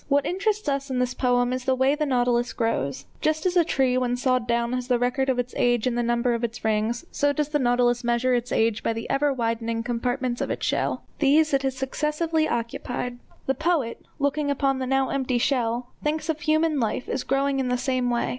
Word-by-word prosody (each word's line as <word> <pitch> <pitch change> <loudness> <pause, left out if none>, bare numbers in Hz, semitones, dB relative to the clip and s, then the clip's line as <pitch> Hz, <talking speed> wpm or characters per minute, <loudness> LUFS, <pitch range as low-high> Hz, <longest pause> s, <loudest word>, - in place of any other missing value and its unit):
What 285 0 +2
interests 400 +2 -1
us 275 -1 -1
in 260 - -2
this 250 0 0
poem 245 -1 +1
is 255 0 -4
the 260 -1 +2
way 265 +2 +3
the 300 0 -1
nautilus 245 -2 +1
grows. 140 - -1 0.2
Just 310 +3 0
as 365 0 +1
a 350 - +6
tree 260 -5 +1
when 245 -1 0
sawed 255 -1 +1
down 235 0 0
has 250 -1 -2
the 250 -1 +3
record 250 +2 0
of 260 - +1
its 245 0 -2
age 240 -2 +2
in 250 - +1
the 240 - 0
number 240 +1 +1
of 235 0 -2
its 230 -1 -4
rings, 220 +6 0
so 285 0 +2
does 295 +1 -1
the 295 -1 0
nautilus 245 -1 +2
measure 240 +2 +1
its 245 0 -1
age 225 -1 +1
by 230 - 0
the 225 0 -5
ever 285 +1 +2
widening 230 -2 -1
compartments 245 +1 -2
of - - -2
its - - -2
shell. - - -1 0.2
These 305 +1 +4
it 275 - +3
has 265 -1 -2
successively 310 +4 0
occupied. 245 +1 -3 0.3
The 270 - +1
poet, 310 -6 -1
looking 285 +1 0
upon 275 -1 +1
the 260 - -2
now 270 0 +1
empty 260 -2 0
shell, 240 -1 0
thinks 310 +1 -1
of 315 -1 0
human 310 0 +2
life 230 +1 -1
as 260 - -2
growing 275 +1 0
in 260 - 0
the 250 0 +1
same 255 -1 0
way. 240 -1 0
255 Hz, 225 wpm, -25 LUFS, 240-280 Hz, 0.3 s, a